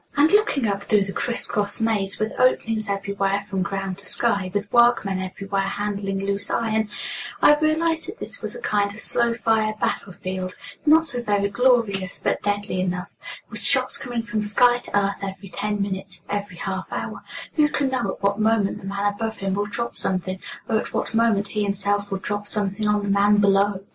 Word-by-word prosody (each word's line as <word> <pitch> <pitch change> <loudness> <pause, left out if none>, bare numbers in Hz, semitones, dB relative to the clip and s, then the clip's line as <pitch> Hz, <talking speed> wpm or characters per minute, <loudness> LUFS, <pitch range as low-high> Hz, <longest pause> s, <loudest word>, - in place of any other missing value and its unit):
And 300 +3 +5
looking 415 - +3
up 200 -1 -1
through 205 0 +3
the 195 0 -6
criss 240 0 0
cross 205 -2 -1
maze, 215 -4 0
with 215 +1 -2
openings 225 -4 +2
everywhere 200 0 -1
from 195 -2 -3
ground 195 +1 -3
to 200 - -8
sky, 200 -6 +2
with 205 +1 -3
workmen 235 -6 +4
everywhere 195 +1 -3
handling 195 -1 -2
loose 200 0 0
iron, 220 -2 0 0.5
I - - +7
realized 320 +1 +1
that 390 +5 -7
this - - -7
was - - -4
a 485 - -8
kind 205 - +1
of 210 - -6
slow 235 +1 +3
fire 220 -2 +1
battle 195 -1 -2
field, 185 0 -5 0.3
not 320 +2 +6
so 250 -5 -1
very 205 -3 +1
glorious, 205 -5 +2
but - - 0
deadly 205 -2 -1
enough, 180 0 -2 0.4
with - - -3
shots - - +3
coming 240 -3 -3
from 215 -1 -2
sky 240 +4 +5
to 225 - -2
earth 200 0 -1
every 195 0 -6
ten 205 +3 -2
minutes, 190 -2 -4
every 205 -3 -4
half 190 +1 -4
hour - - -4 0.3
who 300 -2 +3
can 280 -2 0
know 255 -2 -1
at - - -23
what 200 +1 +1
moment 220 -2 +2
the 190 - -8
man 200 +1 0
above 220 +1 -4
him 195 -1 -2
will 205 +1 -1
drop 235 +3 -4
something, 185 0 -1 0.3
or 220 - +2
at - - -6
what - - -2
moment 225 -3 +2
he 210 - -2
himself 200 0 0
will 195 - -2
drop 205 +1 -4
something 205 0 -1
on 210 0 +2
the - - -3
man 200 +1 +4
below! 200 -1 +3
205 Hz, 200 wpm, -23 LUFS, 195-225 Hz, 0.5 s, I